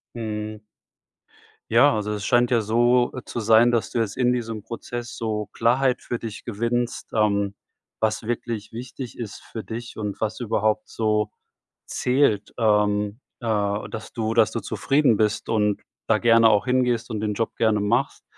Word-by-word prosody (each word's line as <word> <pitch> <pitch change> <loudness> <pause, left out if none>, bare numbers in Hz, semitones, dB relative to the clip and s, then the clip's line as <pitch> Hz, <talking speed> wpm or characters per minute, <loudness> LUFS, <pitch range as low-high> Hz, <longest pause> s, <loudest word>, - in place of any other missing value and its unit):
Mhm. 110 -2 -4 1.1
Ja, - - +6
also 105 -1 -2
es 105 -1 -4
scheint 120 0 +3
ja 120 -2 +3
so, 120 +3 +3
äh, 130 - -6
zu 120 - -4
sein, 115 +2 +5
dass 120 -2 0
du 120 - -1
jetzt 110 -2 -1
in 125 -1 +2
diesem 115 -3 -3
Prozess 120 +1 -6
so 110 -2 -2
Klarheit 125 +2 +1
für 120 - -3
dich 115 -3 -7
gewinnst, 120 +2 -2
ähm, 100 -2 +1 0.4
was 110 +1 0
wirklich 115 -1 -4
wichtig 125 +2 -7
ist 110 -4 -6
für 110 - -8
dich 115 +1 -7
und 105 -2 -4
was 110 -1 -2
überhaupt 110 -2 0
so 105 -1 0 0.6
zählt, 125 -5 +1
ähm, 105 0 +2 0.2
äh, 105 -3 -1
dass 110 -1 -7
du 110 -1 -2
dass 115 -1 +4
du 115 - -3
zufrieden 135 0 +2
bist 105 0 0
und 105 -2 +1 0.3
da - - +4
gerne 115 -1 +5
auch 105 -2 +3
hingehst 125 -2 +1
und 110 -2 -3
den 105 -1 -1
Job 115 +2 -2
gerne 110 -2 +2
machst. 105 0 0
110 Hz, 165 wpm, -24 LUFS, 105-120 Hz, 1.1 s, Ja